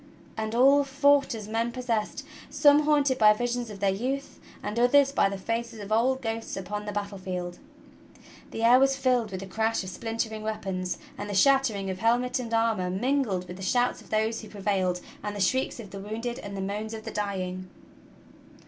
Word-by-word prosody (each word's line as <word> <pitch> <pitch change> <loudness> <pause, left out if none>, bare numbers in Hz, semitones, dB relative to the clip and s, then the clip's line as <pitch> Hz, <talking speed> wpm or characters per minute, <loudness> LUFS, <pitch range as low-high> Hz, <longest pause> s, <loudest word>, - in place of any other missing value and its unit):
And 220 +1 -3
all 275 +3 +6
fought 280 -1 +3
as 215 -2 -7
men 230 +2 -1
possessed, 245 +2 -2 0.2
some 290 0 +5
haunted 285 -3 +3
by 210 -1 +7
visions 245 +1 -2
of 200 -2 -9
their 200 -1 +3
youth 265 +7 -3 0.2
and 215 +3 -2
others 275 +3 +5
by 235 - +3
the 195 - -4
faces 230 +3 -3
of 205 0 -8
old 255 +4 +2
ghosts 225 -2 -3
upon 205 +2 -4
the 210 - -3
battle 200 -1 -4
field. 180 -1 -5 0.9
The 225 - -5
air 245 +2 +7
was 270 0 +4
filled 255 -4 +1
with 190 -1 -5
the - - -6
crash 220 +2 -1
of 185 - -6
splintering 225 0 -3
weapons 190 -4 -3 0.2
and 205 0 -5
the 200 - -3
shattering 225 -5 +3
of 185 - -6
helmet 245 +3 +1
and 235 -2 -5
armor 225 -5 +1
mingled 205 -2 0
with 180 - -8
the - - -10
shouts 245 +6 +1
of - - -18
those 220 +1 0
who 215 - -11
prevailed 190 -3 -1 0.2
and 205 0 -4
the - - -5
shrieks 260 +7 +1
of 205 -5 -9
the 195 - -7
w'ounded 225 +4 -4
and 200 -1 -7
the - - -3
moans 210 +3 -3
of 220 - -8
the - - -5
dying. 185 -3 -3
220 Hz, 200 wpm, -27 LUFS, 200-250 Hz, 0.9 s, by